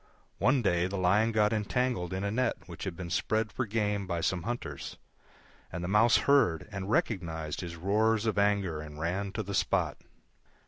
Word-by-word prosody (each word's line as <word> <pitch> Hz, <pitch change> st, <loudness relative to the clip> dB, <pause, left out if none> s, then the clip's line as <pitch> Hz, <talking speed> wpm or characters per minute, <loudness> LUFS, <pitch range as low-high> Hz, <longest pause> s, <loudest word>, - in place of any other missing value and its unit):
One 130 Hz, 0 st, +3 dB
day 90 Hz, -3 st, +2 dB
the 100 Hz, +1 st, -4 dB
Lion 100 Hz, +5 st, +3 dB
got 110 Hz, -1 st, +2 dB
entangled 110 Hz, -3 st, -1 dB
in 95 Hz, +1 st, -3 dB
a 100 Hz, -, -1 dB
net 125 Hz, +2 st, +1 dB
which -, -, -8 dB
had 95 Hz, -3 st, -4 dB
been 85 Hz, -2 st, -6 dB
spread 110 Hz, +3 st, 0 dB
for 130 Hz, -, -2 dB
game 105 Hz, -2 st, -1 dB
by 85 Hz, -2 st, -2 dB
some 90 Hz, +1 st, 0 dB
hunters, 80 Hz, -, -5 dB, 0.7 s
and 85 Hz, -, -4 dB
the -, -, -2 dB
Mouse 105 Hz, +4 st, +5 dB
heard 135 Hz, -, +3 dB
and 100 Hz, -1 st, -5 dB
recognised 80 Hz, -9 st, -1 dB
his 85 Hz, -2 st, -6 dB
roars 105 Hz, +5 st, +1 dB
of 110 Hz, -2 st, +1 dB
anger 100 Hz, -6 st, +1 dB
and 75 Hz, -1 st, -9 dB
ran 95 Hz, +5 st, -2 dB
to 110 Hz, -, -2 dB
the 100 Hz, 0 st, -6 dB
spot. -, -, +1 dB
100 Hz, 185 wpm, -30 LUFS, 90-110 Hz, 0.7 s, Mouse